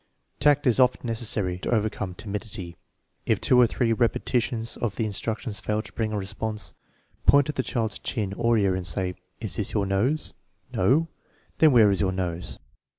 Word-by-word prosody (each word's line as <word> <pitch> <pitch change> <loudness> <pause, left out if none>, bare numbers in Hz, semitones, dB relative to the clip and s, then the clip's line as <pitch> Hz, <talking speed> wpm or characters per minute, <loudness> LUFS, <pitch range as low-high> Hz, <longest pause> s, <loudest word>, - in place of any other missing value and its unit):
Tact 145 0 +3
is 125 -1 +3
often 125 0 +3
necessary 110 -6 -1
to - - -4
overcome 105 -4 -1
timidity. 100 -4 -6 0.5
If - - +2
two 125 -1 +4
or 120 - +6
three 115 0 0
repetitions 115 0 0
of 110 -5 -2
the 110 - -1
instruction 110 +3 -3
fail 105 +2 -1
to - - -12
bring 110 -2 -2
a 105 - -2
response, 105 +2 -4 0.5
point 140 0 +6
to 150 - -2
the 135 - -1
child's 115 -4 -2
chin 100 -4 -3
or 115 +2 +2
ear 100 -3 +2
and 90 -1 -2
say: 90 +3 -1
" 90 - -45
Is 110 - +1
this 105 - -1
your 105 -2 +1
nose? 110 +11 +2
" - - -46
" - - -42
No? 135 - +3 0.2
" - - -37
" - - -37
Then 155 -2 +6
where 110 -5 +6
is 95 - +1
your 95 -2 +1
nose 90 -2 -3
110 Hz, 205 wpm, -25 LUFS, 95-120 Hz, 0.5 s, or